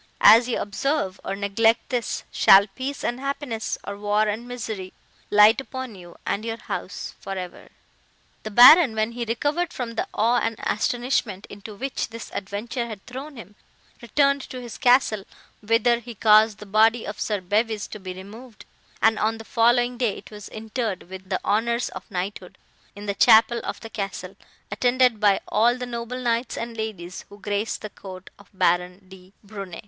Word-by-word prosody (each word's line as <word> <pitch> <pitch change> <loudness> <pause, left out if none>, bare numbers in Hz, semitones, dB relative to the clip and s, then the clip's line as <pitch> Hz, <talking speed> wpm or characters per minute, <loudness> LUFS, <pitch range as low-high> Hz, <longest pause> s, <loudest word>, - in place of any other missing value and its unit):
As 235 +2 +7
ye 240 - 0
observe, 205 -1 -2
or 195 - -3
neglect 210 +3 +1
this, 245 -3 -2
shall 195 +1 +7
peace 260 +8 -6
and 240 +1 -2
happiness, 275 -5 -3
or 200 - -6
war 210 +1 +1
and 220 +4 -3
misery, 220 -6 -6 0.4
light 210 +4 +6
upon 260 -3 -7
you 175 -3 -13
and 205 - -2
your 225 0 -4
house - - -6
for 195 - -6
ever!" 180 -1 -8 0.7
"The 215 - -6
Baron, 250 - +8
when 220 +1 0
he 235 0 -4
recovered 290 +9 -1
from 245 -2 -5
the 230 - -2
awe 235 +3 +2
and 225 -1 -1
astonishment, 240 -3 -1
into 205 +1 -10
which 265 +5 -3
this 230 0 -9
adventure 215 +5 -4
had 215 -4 -9
thrown 275 +4 -8
him, 210 -4 -11 0.5
returned 280 +4 +2
to 255 - -7
his 240 -2 -9
castle, 245 -5 +3 0.4
whither 230 +2 +2
he 240 0 -10
caused 215 0 +5
the 210 - -10
body 220 +3 +3
of 205 +1 -6
Sir 210 -2 -1
Bevys 210 +3 -1
to 215 - -8
be 185 -1 -7
removed; 215 +5 -12 0.4
and, 220 -1 +4
on 220 +1 0
the 225 - -10
following 240 +2 +2
day, 230 -6 0
it - - -13
was 210 -1 -10
interred, 220 -4 -4
with 190 0 -9
the 185 - 0
honours 235 +3 +1
of 185 - -10
knighthood, 185 +3 -5 0.4
in 205 +1 -9
the 200 - -1
chapel 225 +3 +5
of - - -5
the 225 - -8
castle, 195 -2 -5 0.4
attended 245 +1 +2
by 205 -2 +4
all 235 +4 +3
the 250 - -4
noble 235 0 -5
knights 235 0 -1
and 230 0 -5
ladies, 200 -6 -6
who 205 - -14
graced 205 +2 -2
the 215 - -5
court 185 -1 -11
of 200 - -18
Baron 180 0 0
de 185 0 -15
Brunne." 195 -4 -8
220 Hz, 180 wpm, -24 LUFS, 200-240 Hz, 0.7 s, Baron